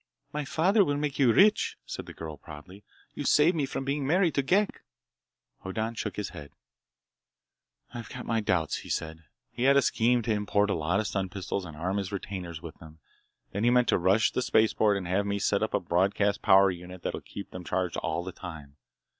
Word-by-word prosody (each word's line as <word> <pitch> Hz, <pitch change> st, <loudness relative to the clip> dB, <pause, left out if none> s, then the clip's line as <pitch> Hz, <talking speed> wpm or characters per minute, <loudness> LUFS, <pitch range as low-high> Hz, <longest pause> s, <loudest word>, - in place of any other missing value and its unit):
"My 150 Hz, 0 st, -2 dB
father 190 Hz, +9 st, +3 dB
will 145 Hz, -5 st, 0 dB
make 145 Hz, -1 st, -3 dB
you 130 Hz, -4 st, +5 dB
rich," 205 Hz, -, +4 dB
said -, -, -7 dB
the -, -, -9 dB
girl 80 Hz, -2 st, -7 dB
proudly. 80 Hz, +7 st, -12 dB, 0.3 s
"You -, -, -5 dB
saved 160 Hz, +4 st, +4 dB
me 145 Hz, -4 st, 0 dB
from 135 Hz, -, -4 dB
being 140 Hz, +1 st, -1 dB
married 175 Hz, 0 st, +3 dB
to 140 Hz, -, +2 dB
Ghek!" 190 Hz, +9 st, +1 dB, 0.8 s
Hoddan 110 Hz, +4 st, -3 dB
shook 105 Hz, -4 st, -4 dB
his 105 Hz, -, -3 dB
head. 70 Hz, -1 st, -11 dB, 1.4 s
"I've 115 Hz, -2 st, -7 dB
got 125 Hz, -, -7 dB
my 115 Hz, -1 st, 0 dB
doubts," 85 Hz, -7 st, 0 dB
he -, -, -10 dB
said. 80 Hz, 0 st, -4 dB, 0.3 s
"He 120 Hz, -, -8 dB
had 140 Hz, +1 st, +6 dB
a -, -, +6 dB
scheme 120 Hz, +1 st, +2 dB
to 115 Hz, -, 0 dB
import 105 Hz, 0 st, +1 dB
a -, -, +2 dB
lot 85 Hz, +4 st, 0 dB
of 110 Hz, -, -1 dB
stun 95 Hz, -2 st, -2 dB
pistols 95 Hz, 0 st, -4 dB
and 80 Hz, -3 st, -10 dB
arm 95 Hz, +5 st, -2 dB
his 100 Hz, 0 st, -3 dB
retainers 90 Hz, -4 st, -6 dB
with 85 Hz, -, -9 dB
them. 80 Hz, 0 st, -13 dB, 0.5 s
Then 100 Hz, +2 st, -2 dB
he 120 Hz, -, +5 dB
meant 125 Hz, 0 st, +3 dB
to -, -, +3 dB
rush 95 Hz, +5 st, +3 dB
the -, -, -1 dB
spaceport 110 Hz, -3 st, +3 dB
and 95 Hz, -3 st, -5 dB
have 100 Hz, +3 st, 0 dB
me 100 Hz, 0 st, 0 dB
set 100 Hz, -, +1 dB
up -, -, 0 dB
a -, -, +2 dB
broadcast 100 Hz, +3 st, +1 dB
power 95 Hz, 0 st, +6 dB
unit 90 Hz, 0 st, -9 dB
that'd -, -, -4 dB
keep 100 Hz, -, -9 dB
them 90 Hz, -, -7 dB
charged 75 Hz, -, -2 dB
all 85 Hz, +2 st, -2 dB
the 95 Hz, -, -6 dB
time. 80 Hz, -6 st, -10 dB
100 Hz, 215 wpm, -28 LUFS, 90-125 Hz, 1.4 s, had